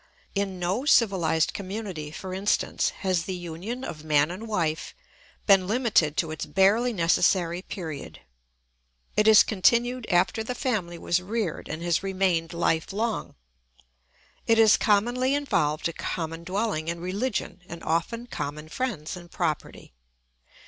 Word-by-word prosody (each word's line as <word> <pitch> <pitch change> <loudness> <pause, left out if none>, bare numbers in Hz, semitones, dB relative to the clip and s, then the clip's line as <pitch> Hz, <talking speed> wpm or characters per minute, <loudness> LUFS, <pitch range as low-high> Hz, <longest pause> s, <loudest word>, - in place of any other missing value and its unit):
In 195 -2 -2
no 180 +8 -1
civilised 190 - +3
community, 195 -6 -5
for 185 +4 -7
instance, 195 +2 +1 0.2
has 180 -3 +1
the 190 - -3
union 180 +9 -6
of 155 -9 -6
man 150 0 +3
and 205 +6 -7
wife 165 -7 -2 0.5
been 195 -3 +5
limited 215 - +2
to 165 -2 0
its 155 - -4
barely 200 +9 +3
necessary 175 -2 +2
period. 165 -7 -7 1.0
It 210 - +3
has 220 0 +9
continued 235 +4 +2
after 180 +4 +2
the 250 +3 -4
family 195 -10 -2
was 170 +1 0
reared 205 -3 -3
and 160 +2 -5
has 175 -1 +1
remained 185 -4 0
life 165 -1 0
long; 220 +3 -2 1.1
it 225 - +4
has 220 -1 +7
commonly 240 +6 +2
involved 155 - 0
a 170 - -5
common 165 -1 -4
dwelling 190 -4 -1
and 170 0 -3
religion 195 +3 -3
and 170 - -8
often 170 +9 -1
common 150 -6 -5
friends 195 -10 -3
and 175 -1 -11
property. 165 - -3
185 Hz, 140 wpm, -26 LUFS, 165-220 Hz, 1.1 s, has